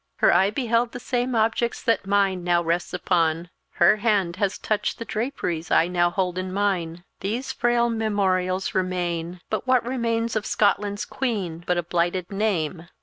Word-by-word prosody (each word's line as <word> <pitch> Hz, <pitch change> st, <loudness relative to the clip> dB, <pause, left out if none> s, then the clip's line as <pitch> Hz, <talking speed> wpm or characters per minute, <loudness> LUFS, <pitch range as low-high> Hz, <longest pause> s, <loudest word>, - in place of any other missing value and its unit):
Her -, -, +4 dB
eye 190 Hz, +3 st, +4 dB
beheld 235 Hz, +1 st, 0 dB
the 245 Hz, -, -5 dB
same 245 Hz, 0 st, -1 dB
objects 230 Hz, +1 st, +1 dB
that 230 Hz, -5 st, +1 dB
mine 195 Hz, -2 st, +2 dB
now 175 Hz, -1 st, +2 dB
rests 170 Hz, +1 st, -1 dB
upon; 170 Hz, -1 st, 0 dB, 0.2 s
her 215 Hz, -, +5 dB
hand 200 Hz, -5 st, +1 dB
has 200 Hz, -1 st, 0 dB
touched 215 Hz, -1 st, -1 dB
the 230 Hz, -, -6 dB
draperies 210 Hz, -, -3 dB
I 165 Hz, -, +4 dB
now 175 Hz, -1 st, +2 dB
hold 180 Hz, 0 st, -1 dB
in 185 Hz, 0 st, -4 dB
mine. 180 Hz, -4 st, -1 dB, 0.2 s
These 230 Hz, +7 st, -3 dB
frail 240 Hz, 0 st, +2 dB
memorials 195 Hz, -5 st, 0 dB
remain; 175 Hz, -2 st, -2 dB
but -, -, -2 dB
what 255 Hz, -2 st, +3 dB
remains 230 Hz, -2 st, -1 dB
of 215 Hz, -1 st, -1 dB
Scotland's 205 Hz, 0 st, +1 dB
Queen 195 Hz, -10 st, -3 dB
but 180 Hz, -, +1 dB
a 175 Hz, -, 0 dB
blighted 175 Hz, +2 st, -1 dB
name!" 180 Hz, -5 st, -1 dB
195 Hz, 165 wpm, -24 LUFS, 175-225 Hz, 0.2 s, her